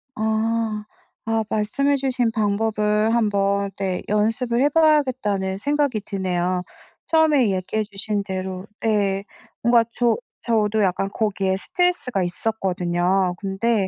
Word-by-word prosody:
아 220 Hz, 0 st, -1 dB, 0.4 s
아 225 Hz, 0 st, +1 dB
말씀해 275 Hz, +7 st, +1 dB
주신 255 Hz, -4 st, 0 dB
방법을 215 Hz, 0 st, +1 dB
한번 200 Hz, -3 st, +1 dB
네 190 Hz, -2 st, -2 dB
연습을 225 Hz, +4 st, +1 dB
해 285 Hz, -, +4 dB
봐야겠다는 255 Hz, -12 st, +2 dB
생각이 285 Hz, 0 st, 0 dB
드네요. 180 Hz, -2 st, -1 dB, 0.5 s
처음에 300 Hz, -9 st, +4 dB
얘기해 190 Hz, +4 st, -1 dB
주신 205 Hz, +1 st, -2 dB
대로 185 Hz, -1 st, -5 dB, 0.2 s
예 200 Hz, -2 st, +1 dB, 0.4 s
뭔가 235 Hz, 0 st, +5 dB
저 240 Hz, -1 st, +2 dB, 0.3 s
저도 220 Hz, -2 st, +1 dB
약간 195 Hz, +1 st, 0 dB
거기에 195 Hz, -3 st, 0 dB
스트레스가 260 Hz, -, 0 dB
있었거든요. 180 Hz, -2 st, 0 dB
근데 200 Hz, +1 st, 0 dB
210 Hz, 265 characters per minute, -22 LUFS, 195-235 Hz, 0.5 s, 뭔가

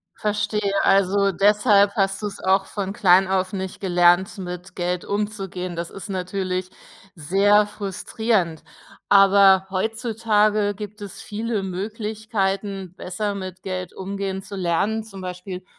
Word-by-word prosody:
Verstehe, 210 Hz, -1 st, -1 dB
also, 195 Hz, 0 st, +3 dB
deshalb 205 Hz, +1 st, +4 dB
hast 195 Hz, 0 st, 0 dB
du's 205 Hz, -1 st, -4 dB
auch 190 Hz, +1 st, +2 dB
von 195 Hz, -2 st, -4 dB
klein 190 Hz, -3 st, +5 dB
auf 185 Hz, 0 st, 0 dB
nicht 190 Hz, -1 st, -5 dB
gelernt, 180 Hz, +2 st, +3 dB
mit 180 Hz, 0 st, -7 dB
Geld 180 Hz, 0 st, -2 dB
umzugehen. 195 Hz, -3 st, -3 dB
Das 170 Hz, 0 st, -5 dB
ist 195 Hz, -, -9 dB
natürlich 185 Hz, 0 st, -3 dB, 0.4 s
sehr 200 Hz, +5 st, +3 dB
frustrierend. 205 Hz, -3 st, -2 dB, 0.5 s
Aber 195 Hz, -1 st, +6 dB
heutzutage 215 Hz, 0 st, +1 dB
gibt 210 Hz, +1 st, -8 dB
es 200 Hz, -, -8 dB
viele 215 Hz, -1 st, -3 dB
Möglichkeiten, 200 Hz, -1 st, -3 dB
besser 205 Hz, +2 st, -3 dB
mit 185 Hz, -1 st, -7 dB
Geld 185 Hz, -2 st, -5 dB
umgehen 195 Hz, 0 st, -4 dB
zu 195 Hz, +1 st, -10 dB
lernen, 195 Hz, +5 st, 0 dB
zum 195 Hz, -3 st, -11 dB
Beispiel 180 Hz, 0 st, -7 dB
195 Hz, 125 wpm, -22 LUFS, 185-210 Hz, 0.5 s, Aber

